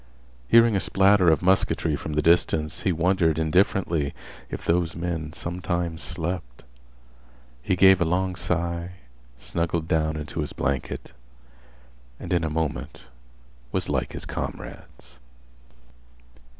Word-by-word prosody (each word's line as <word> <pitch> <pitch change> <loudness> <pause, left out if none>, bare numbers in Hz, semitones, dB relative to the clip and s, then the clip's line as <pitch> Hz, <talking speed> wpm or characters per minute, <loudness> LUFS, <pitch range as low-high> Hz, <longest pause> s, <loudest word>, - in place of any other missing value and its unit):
Hearing 115 - +6
a - - +3
splatter 95 -1 +4
of 80 +2 +2
musketry 90 -4 +2
from 75 - -5
the 75 - +1
distance, 80 -2 +2
he 95 - 0
wondered 85 -1 +2
indifferently 80 -2 +1 0.3
if - - -6
those 85 0 +1
men 85 -2 -3
sometimes 85 -1 -3
slept. 80 -8 -5 1.0
He 90 - 0
gave 95 0 +6
a - - +4
long 90 +2 0
sigh, 85 0 -2 0.4
snuggled 85 +5 -2
down 80 -2 +1
into 75 +2 -6
his 75 - -3
blanket, 70 -2 -3 1.1
and - - -4
in 85 -2 +2
a 80 - 0
moment 80 -1 -3 0.7
was - - -2
like - - -1
his - - -7
comrades. - - -8
85 Hz, 125 wpm, -25 LUFS, 80-90 Hz, 1.1 s, Hearing